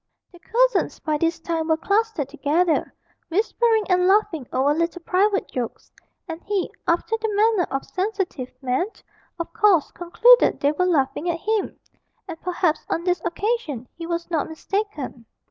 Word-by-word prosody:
The 350 - -16
cousins - - +1
by 305 -1 -1
this 330 0 0
time 325 -1 -2
were 320 -1 +2
clustered 400 - 0
together, 310 +4 0 0.4
whispering 445 +4 +2
and 360 -1 +3
laughing 380 - +2
over 275 +3 +2
little 335 +2 -2
private 395 +3 +1
jokes, 245 -3 -5 0.4
and 325 0 -6
he, 405 -3 -1 0.2
after 345 +6 +1
the 445 - 0
manner 425 -3 +3
of 270 0 -3
sensitive 375 - -3
men, 260 +8 0 0.5
of 335 - -5
course 415 -8 +3
concluded 475 +8 +4
they 285 - +2
were 365 +4 0
laughing 315 +1 +1
at 335 - 0
him, 435 0 -1 0.5
and 330 -3 -8
perhaps 350 -3 0
on 335 - -1
this 360 0 0
occasion 345 - -2
he 335 -1 -7
was 340 0 -3
not 320 -2 0
mistaken. 320 - -4
345 Hz, 155 wpm, -23 LUFS, 315-410 Hz, 0.5 s, concluded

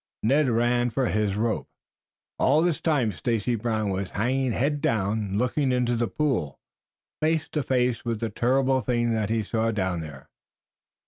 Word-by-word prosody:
Ned 135 +5 +3
ran 120 +1 +2
for 125 +1 0
his 105 -2 0
rope. 110 +1 -1 0.7
All 150 +4 +4
this 175 -4 0
time 140 -9 +1
Stacy 115 +3 -1
Brown 110 -2 -1
was 95 0 -3
hanging 130 +4 0
head 145 +5 0
down, 105 -3 0
looking 130 +3 +1
into 125 -1 +1
the 120 0 0
pool, 125 - -1 0.6
face 160 0 +1
to 150 - -1
face 125 -3 0
with 115 -3 -2
the 115 0 -2
terrible 130 +2 +2
thing 120 0 0
that 110 -2 -1
he 110 -1 0
saw 110 +2 0
down 95 -5 -1
there. 70 -4 -10
120 Hz, 160 wpm, -26 LUFS, 110-130 Hz, 0.7 s, All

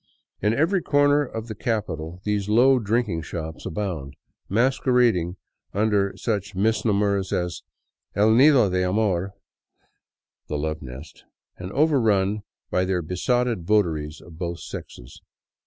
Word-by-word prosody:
In 105 - +2
every 170 +7 +2
corner 145 -1 +3
of 115 -4 -6
the 110 - -5
capital 90 -7 -3
these 105 -1 -1
low 125 +4 +5
drinking 110 -5 0
shops 80 -1 -6
abound, 80 -7 -4 0.3
mas 125 +7 +2
querading 115 -9 +2 0.4
under 100 -2 +1
such 105 -3 -2
misnomers 100 -2 +1
as 90 -1 -2 0.3
" - - -47
El 105 +3 +4
Nido 130 -2 +6
de 90 0 0
Amor 95 -1 0 0.4
" - - -43
— - - -50
" - - -66
The 75 - -1
Love 80 +1 -3
Nest,'' 65 +3 -10 0.2
— - - -52
and 90 +1 -6
overrun 110 -9 +2 0.3
by 90 - +2
their 90 -2 -1
besotted 115 +5 0
votaries 80 -8 +1
of 80 -1 -14
both 85 -1 -4
sexes. - - -9
100 Hz, 145 wpm, -24 LUFS, 85-115 Hz, 0.4 s, Nido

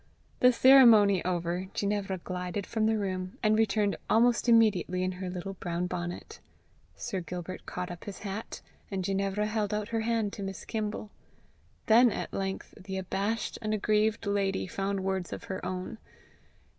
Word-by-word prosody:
The 250 - +7
ceremony 230 -7 +7
over, 175 +1 -1
Ginevra 200 -2 -1
glided 180 +2 -4
from 220 -1 0
the 220 0 +2
room, 185 -2 -3
and 215 0 +4
returned 215 -2 +2
almost 240 +2 +3
immediately 205 -5 +3
in 185 - 0
her 185 0 -5
little 180 +2 -5
brown 175 -1 -3
bonnet. 175 -1 -5 0.6
Sir 200 -6 -4
Gilbert 180 +2 -7
caught 180 0 -4
up 175 - -9
his 205 - -7
hat, 200 +3 -6 0.3
and 190 -2 -2
Ginevra 195 +2 0
held 215 -1 -1
out 210 +1 -3
her 230 - -1
hand 225 -2 0
to - - -7
Miss 195 -1 -6
Kimble. 215 -1 -4 0.7
Then 235 +2 +6
at - - -5
length 195 0 -4
the 190 0 -5
abashed 200 +4 -2
and 215 -1 0
aggrieved 215 +2 +1
lady 200 -1 0
found 195 +1 -2
words 190 -2 -2
of - - -6
her 190 - -5
own. 185 +4 -4
195 Hz, 160 wpm, -29 LUFS, 185-215 Hz, 0.7 s, The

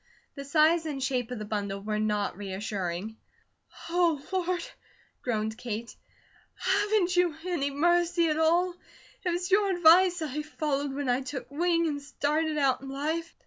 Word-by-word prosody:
The 280 -1 -8
size 315 +3 +3
and 275 -3 -3
shape 250 -3 -1
of 250 - -5
the 215 - -5
bundle 200 -2 -3
were 210 +1 -2
not 210 -1 0
reassuring. 195 0 -4 0.7
"Oh, 335 -3 +2
Lord!" 365 -2 -1 0.6
groaned 220 -2 -2
Kate. 235 -1 -5 0.6
"Haven't 395 -1 +1
You 355 -3 +3
any 295 -6 0
mercy 345 +3 +2
at 305 +1 0
all? 345 +3 +3 0.5
It 365 - 0
was 355 +2 -2
Your 400 +1 +4
advice 350 0 +5
I 300 0 -3
followed 290 -2 -2
when 285 -1 -3
I 250 +1 +2
took 265 +1 -6
wing 335 +2 +1
and 290 -3 -2
started 300 +2 -1
out 275 -3 +2
in 270 - -8
life." 315 +5 -3
300 Hz, 155 wpm, -28 LUFS, 250-345 Hz, 0.7 s, advice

